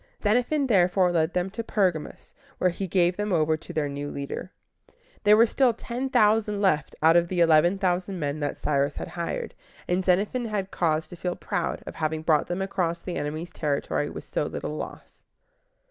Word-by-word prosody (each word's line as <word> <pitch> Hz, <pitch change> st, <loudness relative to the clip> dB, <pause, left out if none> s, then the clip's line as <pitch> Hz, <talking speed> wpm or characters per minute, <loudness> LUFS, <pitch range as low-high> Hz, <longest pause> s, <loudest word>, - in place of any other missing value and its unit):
Xenophon 250 Hz, +7 st, +2 dB
therefore 185 Hz, -5 st, +3 dB
led 165 Hz, 0 st, +1 dB
them 180 Hz, +1 st, 0 dB
to 230 Hz, -, -4 dB
Per´ga 185 Hz, -8 st, +1 dB
mus, -, -, -13 dB, 0.2 s
where 180 Hz, -, +2 dB
he 190 Hz, +2 st, -4 dB
gave 175 Hz, 0 st, +2 dB
them 205 Hz, 0 st, -2 dB
over 160 Hz, -2 st, +2 dB
to 155 Hz, -, -10 dB
their 150 Hz, -2 st, -1 dB
new 145 Hz, +1 st, -5 dB
leader. 140 Hz, +7 st, -6 dB, 0.7 s
There 210 Hz, 0 st, +6 dB
were 230 Hz, -, +7 dB
still 245 Hz, 0 st, +2 dB
ten 250 Hz, +4 st, -4 dB
thousand 210 Hz, -2 st, +3 dB
left 155 Hz, -8 st, +1 dB
out 165 Hz, +1 st, +6 dB
of 170 Hz, 0 st, +4 dB
the 180 Hz, 0 st, -2 dB
eleven 170 Hz, +3 st, +5 dB
thousand 185 Hz, 0 st, -1 dB
men 145 Hz, -1 st, -2 dB
that 145 Hz, -2 st, -2 dB
Cyrus 140 Hz, -1 st, 0 dB
had -, -, -6 dB
hired, 170 Hz, -1 st, -4 dB, 0.3 s
and 180 Hz, +1 st, +1 dB
Xenophon 200 Hz, +7 st, +1 dB
had 205 Hz, -3 st, -3 dB
cause 160 Hz, -2 st, 0 dB
to -, -, -9 dB
feel 180 Hz, +1 st, -3 dB
proud -, -, -3 dB
of -, -, -7 dB
having 155 Hz, 0 st, -2 dB
brought 155 Hz, -2 st, +2 dB
them 180 Hz, +2 st, -2 dB
across 175 Hz, -3 st, -2 dB
the 180 Hz, -, -4 dB
enemy's 155 Hz, +4 st, -4 dB
territory 145 Hz, -3 st, -1 dB
with -, -, -8 dB
so -, -, -2 dB
little -, -, -4 dB
loss. -, -, -8 dB
180 Hz, 190 wpm, -26 LUFS, 160-200 Hz, 0.7 s, were